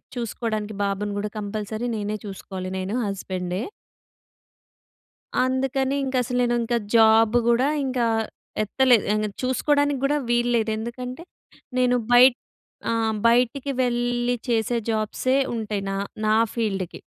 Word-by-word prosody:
చూసుకోడానికి, 215 -3 -3
బాబుని 200 +1 -2
కూడా 210 +1 -2
కంపల్సరీ 215 +2 -4
నేనే 210 0 -3
చూసుకోవాలి. 190 -1 -6
నేను 190 +4 -3
హస్బెండే. 185 -1 -3 1.8
అందుకని 265 +1 0
ఇంక 265 0 -3
అసలు 250 +1 -3
నేను 240 0 +1
ఇంక 240 +1 -1 0.2
జాబ్ 225 0 +6
కూడా 240 +3 +3 0.2
ఇంకా 255 -2 0 0.6
ఎత్తలేదు. 245 +1 +3
ఆహ్, 215 0 0 0.2
చూసుకోవడానికి 285 +2 +1
కూడా 295 +2 +2
వీల్లేదు. 240 -2 +2
ఎందుకంటే 250 +6 -6 0.6
నేను 250 0 +3 0.2
బయట్ 245 +1 +7 0.5
అ! - - +2 0.4
బయటికి 250 +4 +2
వెళ్ళి 245 0 0
చేసే 235 0 +1
జాబ్సే 220 +4 0 0.2
ఉంటాయి. 215 -3 -3
నా - - -2 0.3
నా 215 - +3 0.2
ఫీల్డ్‌కి. 195 -6 -2
235 Hz, 115 wpm, -24 LUFS, 210-250 Hz, 1.8 s, బయట్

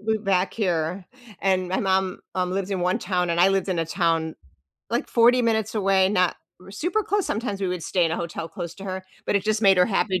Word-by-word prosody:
moved 220 0 -1
back 190 -1 +1
here 180 -3 -1 0.4
and 185 -2 +1
my 185 - 0
mom, 190 -1 0
um, 180 -1 -1
lives 195 0 -2
in 190 -2 -1
one 180 +1 +1
town 180 -2 -1
and 170 +1 +1
I 185 - +6
lived 195 0 0
in 185 -2 -1
a 165 - +1
town, 165 -2 0 0.6
like, 235 - -1
40 245 +1 +4
minutes 220 -2 0
away, 195 -2 +3
r - - 0
not 180 -3 +2 0.3
super 350 - -1
close 405 -1 0
sometimes 205 -3 -3
we 190 - 0
would 180 -2 -3
stay 180 0 +1
in 165 - 0
a - - -1
hotel 165 -1 -5
close 170 0 -6
to 195 - -10
her, 190 -1 -4 0.2
but - - 0
it 195 - 0
just 215 0 0
made 195 -2 +6
her 180 - +5
happy 195 -3 0
190 Hz, 240 wpm, -24 LUFS, 180-205 Hz, 0.6 s, I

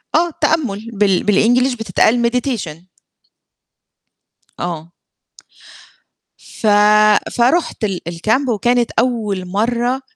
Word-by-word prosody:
آه، 340 +1 +2
تأمُّل 230 -9 -1
بال 195 -3 +1
بالEnglish 245 +5 +2
بتتقال 235 +1 +1
meditation 235 - -3 1.8
آه. 170 -1 -5 1.5
ف 220 - -6 0.7
فرُحت 255 +3 +1
ال 195 -5 -3
الكامب 215 +11 -1
وكانت 240 +2 +1
أول 215 -6 -1
مرّه، 240 +6 -1
230 Hz, 85 wpm, -17 LUFS, 195-245 Hz, 1.8 s, آه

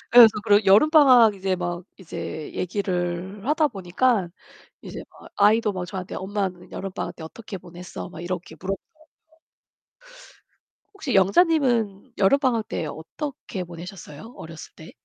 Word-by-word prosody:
예. 240 -1 +12 0.2
그래서 205 -1 +4
여름방학 245 - +6
이제 190 -1 -1
막 175 0 -4
이제 160 -4 -7
얘기를 185 +1 -3
하다 305 +2 +3
보니까 195 -1 0 0.5
이제 - - -8
막 - - -16
아이도 210 +1 +4
막 180 -1 -4
저한테 185 -1 -6
"엄마는 190 -2 -4
여름방학 195 -1 -5
때 160 - -10
어떻게 200 +5 -8
보냈어?" 175 0 -9
막 170 - -9
이렇게 180 +1 -5
물어보거든요. 195 - -6 1.9
혹시 355 - -4
영자님은 235 - +2
여름방학 235 +1 +2
때 - - -3
어떻게 195 - -6
보내셨어요? 175 - -10
어렸을 165 -1 -10
때? 160 - -12
195 Hz, 310 characters per minute, -24 LUFS, 180-230 Hz, 1.9 s, 예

